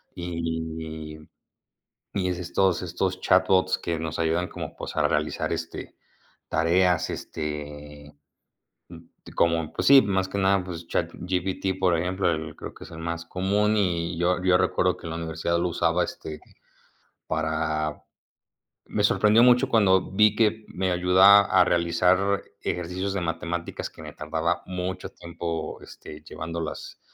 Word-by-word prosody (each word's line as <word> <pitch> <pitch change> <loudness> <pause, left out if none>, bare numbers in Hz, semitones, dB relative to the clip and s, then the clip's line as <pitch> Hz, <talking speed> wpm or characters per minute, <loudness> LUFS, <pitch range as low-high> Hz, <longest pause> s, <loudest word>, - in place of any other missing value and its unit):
Y 80 -2 -5 1.0
y 95 -2 +1
estos 90 +1 0
estos 90 +1 -2
chatbots 95 0 +3
que 85 -1 -3
nos 80 -1 -4
ayudan 85 +2 0
como - - -7
pues - - -7
a - - +3
realizar 75 +1 -1
este - - -6 0.5
tareas, 90 0 +2
este, 75 -1 -7 1.2
como, 85 -2 +1
pues - - -2
sí, 135 -1 +9
más 95 -2 0
que 100 - -5
nada, 95 -1 +3
pues 85 -2 -7
ChatGPT, 95 +1 -2
por 90 -3 +3
ejemplo, 90 +3 0 0.3
creo - - -8
que - - -11
es 90 - -13
el 80 - -9
más 85 0 -4
común 100 +4 +1
y 85 -4 0
yo 90 +1 +1
yo 90 -1 +5
recuerdo 90 0 +1
que - - -11
la 80 - -4
universidad 85 +1 -2
lo 90 - 0
usaba 85 +1 +1
este 75 -1 -7 0.9
para. 80 -1 -1 0.8
Me 105 - -1
sorprendió 105 +2 +4
mucho 125 +1 +5
cuando 95 -6 +3
vi 105 +1 +4
que 110 -1 +1
me 95 0 -2
ayuda 95 +3 +7
a 95 -2 +4
realizar 90 +3 +2 0.2
ejercicios 90 +3 -3
de 100 - -1
matemáticas 85 0 -3
que - - -13
me - - -8
tardaba 80 +2 -2
mucho 90 0 -4
tiempo, 85 -1 -5
este, 75 0 -11
llevándolas 80 -1 -6
90 Hz, 135 wpm, -25 LUFS, 80-95 Hz, 1.2 s, sí